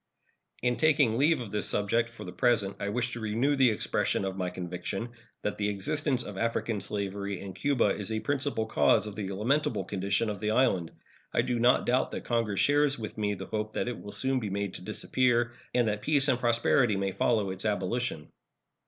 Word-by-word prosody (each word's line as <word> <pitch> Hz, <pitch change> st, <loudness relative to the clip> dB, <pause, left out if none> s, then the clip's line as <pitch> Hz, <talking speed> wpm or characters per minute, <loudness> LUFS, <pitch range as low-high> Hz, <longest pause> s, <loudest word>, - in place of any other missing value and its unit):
In 125 Hz, -1 st, +1 dB
taking 145 Hz, -7 st, +3 dB
leave 150 Hz, +1 st, +4 dB
of 110 Hz, -5 st, -7 dB
this 105 Hz, -, -1 dB
subject 115 Hz, +3 st, +1 dB
for 115 Hz, -, -10 dB
the 90 Hz, -, -6 dB
present 115 Hz, -4 st, +1 dB
I 100 Hz, -, -2 dB
wish 125 Hz, +3 st, -1 dB
to 120 Hz, -, -5 dB
renew 115 Hz, +6 st, +1 dB
the 130 Hz, -3 st, +5 dB
expression 105 Hz, -2 st, 0 dB
of 95 Hz, -1 st, -3 dB
my 90 Hz, -2 st, -2 dB
conviction 90 Hz, +5 st, -5 dB, 0.3 s
that 105 Hz, -, -2 dB
the 105 Hz, 0 st, +1 dB
existence 140 Hz, +6 st, 0 dB
of 100 Hz, -2 st, -7 dB
African 115 Hz, -2 st, -1 dB
slavery 100 Hz, -1 st, -3 dB
in 95 Hz, -1 st, -7 dB
Cuba 135 Hz, -4 st, +2 dB
is 105 Hz, +1 st, -2 dB
a 110 Hz, -, 0 dB
principal 140 Hz, -3 st, 0 dB
cause 110 Hz, -1 st, +3 dB
of 105 Hz, -2 st, -7 dB
the 100 Hz, -2 st, -4 dB
lamentable 110 Hz, +1 st, 0 dB
condition 100 Hz, +3 st, -1 dB
of 100 Hz, -, -6 dB
the 105 Hz, -, -1 dB
island. 110 Hz, -8 st, +2 dB, 0.4 s
I -, -, +2 dB
do 120 Hz, -1 st, -1 dB
not 120 Hz, +2 st, +4 dB
doubt 125 Hz, +2 st, +2 dB
that -, -, -6 dB
Congress 115 Hz, -4 st, 0 dB
shares 145 Hz, 0 st, +3 dB
with 110 Hz, -2 st, -6 dB
me 105 Hz, -1 st, -1 dB
the -, -, -7 dB
hope 110 Hz, 0 st, -3 dB
that -, -, -1 dB
it 120 Hz, -, -4 dB
will 100 Hz, -, -8 dB
soon 130 Hz, +3 st, 0 dB
be 110 Hz, -4 st, -4 dB
made 100 Hz, -1 st, -2 dB
to -, -, -8 dB
disappear, 120 Hz, +4 st, +1 dB, 0.2 s
and 120 Hz, -2 st, +2 dB
that 105 Hz, -1 st, -1 dB
peace 145 Hz, -2 st, +2 dB
and 125 Hz, -, +2 dB
prosperity 120 Hz, -1 st, +3 dB
may 95 Hz, 0 st, -1 dB
follow 100 Hz, 0 st, +1 dB
its 95 Hz, -, -4 dB
abolition. 105 Hz, -4 st, -2 dB
110 Hz, 205 wpm, -29 LUFS, 100-125 Hz, 0.4 s, the